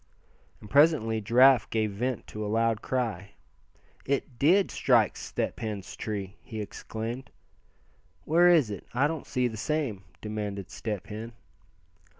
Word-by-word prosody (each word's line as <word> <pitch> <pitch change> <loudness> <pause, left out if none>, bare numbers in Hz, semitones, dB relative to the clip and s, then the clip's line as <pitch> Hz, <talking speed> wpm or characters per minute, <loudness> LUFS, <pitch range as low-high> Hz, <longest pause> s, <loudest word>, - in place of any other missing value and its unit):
And - - -12
presently 140 -6 +4
Giraffe 125 +4 +5
gave 110 -2 0
vent 120 +4 -2
to 105 - -6
a 105 - -3
loud 115 0 +1
cry. 105 -6 -2 0.7
"It 135 -3 -2
did 185 +7 +4
strike - - +3
Step - - -3
Hen's 105 -4 -5
tree!" 100 -2 -5
he 110 - -7
exclaimed. 115 +4 -5 1.0
"Where 175 +3 +5
is 155 -11 +4
it? 100 - -7
I 135 +3 +3
don't 160 0 -3
see 125 -1 +1
the 110 -2 -6
same;" 125 -5 -2 0.2
demanded 105 -3 -5
Step 105 -4 -4
Hen. 110 +2 -7
115 Hz, 140 wpm, -28 LUFS, 105-135 Hz, 1.0 s, Giraffe